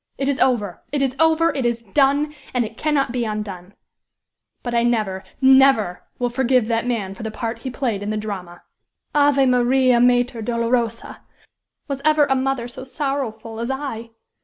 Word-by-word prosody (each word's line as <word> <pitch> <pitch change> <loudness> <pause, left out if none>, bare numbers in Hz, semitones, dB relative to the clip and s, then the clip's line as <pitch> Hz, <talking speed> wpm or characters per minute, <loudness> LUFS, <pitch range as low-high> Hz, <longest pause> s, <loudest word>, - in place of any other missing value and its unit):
It 275 - -1
is 280 -1 0
over! 210 -8 +1
it 285 -1 0
is 265 -1 -1
over! 320 +1 +3
it 270 - -2
is 235 -1 -1
done! 285 +7 +2 0.2
and 245 -2 +2
it 220 +1 -9
cannot 285 -2 0
be 245 -1 -1
undone! 205 -4 -5 0.9
But 240 - -4
I 235 - +3
never 215 -6 0 0.2
never 265 -8 +5 0.2
will 245 -1 -1
forgive 255 -2 +2
that 230 +1 0
man 210 -6 -2
for 230 - -11
the 220 - -3
part 230 +1 -4
he 260 - -5
played 245 -5 -2
in 205 - -4
the 215 - -1
drama!" 190 -5 -6 0.5
"Ave 285 -2 +4
Maria, 250 0 +3
Mater 245 -1 +2
Dolorosa! 235 0 -1 0.7
Was 275 -2 -4
ever 305 -1 +4
a 270 - +1
mother 260 -2 -1
so 245 +2 -9
sorrowful 255 -5 -4
as 235 +2 -3
I? 265 -4 -4
245 Hz, 175 wpm, -21 LUFS, 225-270 Hz, 0.9 s, never